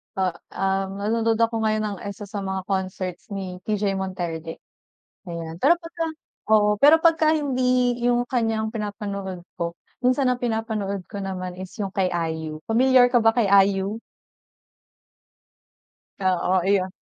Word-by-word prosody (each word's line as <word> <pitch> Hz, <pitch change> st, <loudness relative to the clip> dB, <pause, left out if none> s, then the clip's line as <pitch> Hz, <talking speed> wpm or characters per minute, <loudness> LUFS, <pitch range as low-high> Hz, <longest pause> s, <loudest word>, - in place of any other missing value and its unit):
Ah 190 Hz, -2 st, +1 dB, 0.2 s
um, 195 Hz, +1 st, -1 dB
nanonood 225 Hz, +1 st, +1 dB
ako 230 Hz, 0 st, +2 dB
ngayon 215 Hz, 0 st, +1 dB
ng 205 Hz, -2 st, -3 dB
isa 200 Hz, +1 st, -7 dB
sa 205 Hz, -, -4 dB
mga 190 Hz, -1 st, -3 dB
concerts 185 Hz, -2 st, -3 dB
ni 185 Hz, -2 st, -5 dB
TJ 205 Hz, -2 st, 0 dB
Monterde. 175 Hz, -4 st, -4 dB, 0.7 s
Ayan, 165 Hz, -1 st, -6 dB
pero 320 Hz, +5 st, +6 dB
pagka 330 Hz, -1 st, -4 dB, 0.5 s
oo 210 Hz, -1 st, +5 dB
pero 295 Hz, +3 st, +8 dB
pagka 320 Hz, -2 st, +4 dB
hindi 255 Hz, -4 st, +1 dB
yung 245 Hz, 0 st, +2 dB
kanya 225 Hz, -3 st, 0 dB
yung 220 Hz, +1 st, -5 dB
pinapanood 200 Hz, -4 st, -5 dB
ko, 170 Hz, 0 st, -3 dB, 0.3 s
minsan 255 Hz, +2 st, +3 dB
ang 250 Hz, -1 st, 0 dB
pinapanood 220 Hz, -5 st, -2 dB
ko 200 Hz, -, -6 dB
naman 185 Hz, -2 st, -4 dB
is 185 Hz, 0 st, -8 dB
yung 195 Hz, -2 st, -3 dB
kay 190 Hz, -2 st, +2 dB
IU, 160 Hz, -2 st, -3 dB
pamilyar 250 Hz, +2 st, +5 dB
ka 240 Hz, -, +5 dB
ba 225 Hz, -, +6 dB
kay 230 Hz, -2 st, +2 dB, 0.2 s
IU? 200 Hz, +3 st, -2 dB, 2.2 s
Oo, 185 Hz, 0 st, +2 dB
iyon. 190 Hz, -1 st, +2 dB
200 Hz, 145 wpm, -24 LUFS, 185-230 Hz, 2.2 s, pero